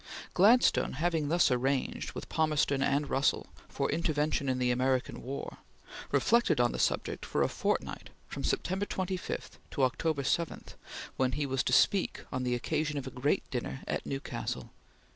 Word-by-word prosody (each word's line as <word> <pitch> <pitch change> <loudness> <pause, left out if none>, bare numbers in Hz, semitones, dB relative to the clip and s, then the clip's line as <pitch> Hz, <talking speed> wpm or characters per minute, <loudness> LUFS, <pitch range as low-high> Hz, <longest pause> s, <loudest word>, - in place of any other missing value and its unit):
Gladstone 225 +7 +5
having 160 +1 0
thus 170 -2 +3
arranged, 130 +2 0
with - - -6
Palmerston 150 -3 +1
and 140 +2 +1
Russell, 135 +2 +1 0.2
for - - -1
intervention 150 -3 0
in 130 - +1
the 125 -1 +2
American 130 +1 0
war, 135 +3 -6 0.5
reflected 235 - +3
on 120 0 +3
the - - -4
subject - - 0
for - - 0
a - - +3
fortnight - - -2 0.2
from - - -6
September 190 +2 -1
25 185 -1 -4
to 140 - -1
October 140 +3 +1
7, 165 +5 -1 0.5
when 130 -1 +1
he 145 +2 -1
was 135 -1 0
to - - -1
speak 195 -2 +3
on 130 - -2
the 125 -1 0
occasion 155 +4 -1
of 135 - -3
a 130 - -6
great 130 +4 0
dinner 65 - -3
at - - -2
Newcastle. 135 0 -4
140 Hz, 160 wpm, -31 LUFS, 130-160 Hz, 0.5 s, Gladstone